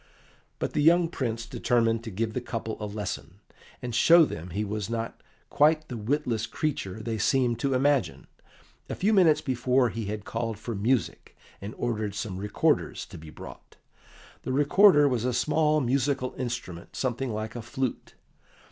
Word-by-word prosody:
But -, -, -3 dB
the 150 Hz, -, +1 dB
young 170 Hz, +2 st, +5 dB
Prince 115 Hz, -7 st, -3 dB
determined 115 Hz, -1 st, +1 dB
to -, -, -4 dB
give 110 Hz, +2 st, -2 dB
the 125 Hz, -, -2 dB
couple 115 Hz, -2 st, -4 dB
a 105 Hz, -, -4 dB
lesson, 100 Hz, -6 st, -5 dB, 0.5 s
and 120 Hz, -1 st, -4 dB
show 165 Hz, +7 st, +7 dB
them 85 Hz, -, -7 dB
he 105 Hz, +5 st, -2 dB
was 105 Hz, 0 st, -4 dB
not 115 Hz, 0 st, -4 dB, 0.3 s
quite 155 Hz, +1 st, +3 dB
the 125 Hz, -, -5 dB
witless 115 Hz, 0 st, -1 dB
creature 110 Hz, -10 st, -3 dB
they 110 Hz, 0 st, -3 dB
seemed 125 Hz, -3 st, +2 dB
to 135 Hz, +1 st, 0 dB
imagine. 140 Hz, +1 st, +1 dB, 0.6 s
A -, -, -3 dB
few 210 Hz, +4 st, +1 dB
minutes 175 Hz, -6 st, +5 dB
before 125 Hz, 0 st, +1 dB
he 110 Hz, +1 st, -5 dB
had 105 Hz, 0 st, -5 dB
called 115 Hz, -2 st, -3 dB
for 115 Hz, +2 st, -5 dB
music, 105 Hz, -4 st, -1 dB, 0.2 s
and 100 Hz, +2 st, -7 dB
ordered 110 Hz, -4 st, -2 dB
some 100 Hz, -4 st, -4 dB
recorders 105 Hz, +1 st, 0 dB
to -, -, -11 dB
be 80 Hz, 0 st, -11 dB
brought. -, -, -12 dB, 0.7 s
The -, -, -4 dB
recorder 145 Hz, +3 st, +5 dB
was 125 Hz, -4 st, 0 dB
a 125 Hz, 0 st, 0 dB
small 155 Hz, +3 st, +2 dB
musical 130 Hz, +1 st, 0 dB
instrument 120 Hz, -9 st, -5 dB
something 130 Hz, 0 st, -2 dB
like 110 Hz, +1 st, -4 dB
a 120 Hz, -, -4 dB
flute. 130 Hz, +2 st, -4 dB
120 Hz, 165 wpm, -27 LUFS, 110-135 Hz, 0.7 s, show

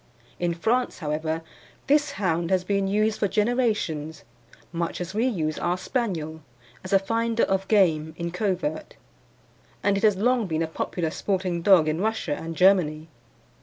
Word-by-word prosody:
In 175 Hz, -1 st, 0 dB
France, 235 Hz, +8 st, 0 dB
however, 160 Hz, +1 st, -2 dB, 0.4 s
this 290 Hz, 0 st, +2 dB
hound 170 Hz, -, -1 dB
has 185 Hz, -1 st, +2 dB
been 200 Hz, +1 st, 0 dB
used 215 Hz, +2 st, +1 dB
for 205 Hz, -, +2 dB
generations, 205 Hz, -, 0 dB, 0.5 s
much 170 Hz, 0 st, -3 dB
as 180 Hz, +1 st, -5 dB
we 225 Hz, +4 st, +1 dB
use 155 Hz, -10 st, -1 dB
our 175 Hz, +1 st, 0 dB
Spaniel, 170 Hz, -, -3 dB, 0.4 s
as 185 Hz, -, -7 dB
a 195 Hz, -, +6 dB
finder 230 Hz, +3 st, 0 dB
of 195 Hz, 0 st, 0 dB
game 160 Hz, -7 st, +2 dB
in 170 Hz, 0 st, -3 dB
covert, 180 Hz, -5 st, -2 dB, 0.9 s
and 200 Hz, -1 st, +2 dB
it 200 Hz, -, -3 dB
has 210 Hz, -2 st, +5 dB
long 235 Hz, +2 st, +1 dB
been 160 Hz, -1 st, -1 dB
a -, -, -2 dB
popular 160 Hz, 0 st, -3 dB
sporting 185 Hz, -3 st, -1 dB
dog 175 Hz, -4 st, +5 dB
in 155 Hz, +3 st, 0 dB
Russia 220 Hz, -6 st, -1 dB
and 165 Hz, +2 st, -6 dB
Germany. 165 Hz, -4 st, +3 dB
185 Hz, 160 wpm, -25 LUFS, 160-215 Hz, 0.9 s, a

